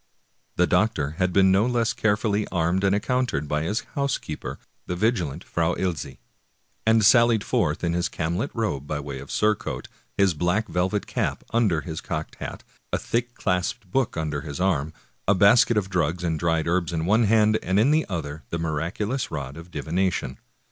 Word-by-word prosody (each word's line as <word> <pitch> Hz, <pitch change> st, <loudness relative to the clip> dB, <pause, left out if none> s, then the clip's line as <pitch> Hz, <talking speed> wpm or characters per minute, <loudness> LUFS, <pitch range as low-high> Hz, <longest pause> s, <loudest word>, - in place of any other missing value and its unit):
The 90 Hz, -, +4 dB
doctor 90 Hz, -6 st, +1 dB
had 90 Hz, 0 st, +2 dB
been 95 Hz, +1 st, +5 dB
no 100 Hz, +5 st, +4 dB
less 120 Hz, -2 st, +1 dB
carefully 105 Hz, -1 st, +1 dB
armed 90 Hz, +2 st, 0 dB
and 100 Hz, 0 st, +3 dB
accou 125 Hz, +5 st, +1 dB
tered 75 Hz, -, -2 dB
by 75 Hz, +1 st, 0 dB
his 105 Hz, +9 st, -1 dB
housekeeper, 140 Hz, -, -3 dB, 0.3 s
the 90 Hz, -, -2 dB
vigilant 90 Hz, -, 0 dB
Frau 85 Hz, +1 st, 0 dB
Ilsy, 90 Hz, -6 st, -3 dB, 0.7 s
and 110 Hz, -2 st, +5 dB
sal 120 Hz, +2 st, +7 dB
lied 110 Hz, -3 st, +1 dB
forth 75 Hz, -1 st, 0 dB
in 85 Hz, -1 st, +1 dB
his 85 Hz, +1 st, 0 dB
camlet 85 Hz, -, -2 dB
robe 105 Hz, -, -2 dB
by 75 Hz, 0 st, -2 dB
way 70 Hz, -2 st, -6 dB
of -, -, -10 dB
surcoat,^ 105 Hz, -1 st, 0 dB, 0.3 s
his 100 Hz, -3 st, +4 dB
black 90 Hz, +8 st, 0 dB
velvet 95 Hz, +3 st, 0 dB
cap -, -, -2 dB
under 105 Hz, -9 st, +2 dB
his 80 Hz, 0 st, -6 dB
cocked 80 Hz, -2 st, -4 dB
hat, -, -, -7 dB, 0.3 s
a -, -, +1 dB
thick 120 Hz, +1 st, -2 dB
clasped 95 Hz, +2 st, -2 dB
book 135 Hz, -5 st, 0 dB
under 75 Hz, -2 st, -2 dB
his 70 Hz, 0 st, -6 dB
arm, 80 Hz, -5 st, +1 dB, 0.4 s
a 100 Hz, -, +5 dB
basket 105 Hz, +4 st, +5 dB
of 100 Hz, -3 st, +1 dB
drugs 90 Hz, -2 st, -1 dB
and 80 Hz, -3 st, -1 dB
dried 80 Hz, -1 st, +1 dB
herbs 85 Hz, -1 st, +1 dB
in 80 Hz, -1 st, -1 dB
one 110 Hz, +5 st, +4 dB
hand, 110 Hz, 0 st, +4 dB
and 95 Hz, +3 st, +1 dB
in 125 Hz, +7 st, +4 dB
the 155 Hz, +1 st, +2 dB
other 80 Hz, -4 st, -4 dB
the 85 Hz, -, -2 dB
miraculous 85 Hz, -, -2 dB
rod 70 Hz, -3 st, -5 dB
of 85 Hz, +2 st, -10 dB
divination. 85 Hz, -5 st, -2 dB
90 Hz, 185 wpm, -25 LUFS, 80-110 Hz, 0.7 s, sal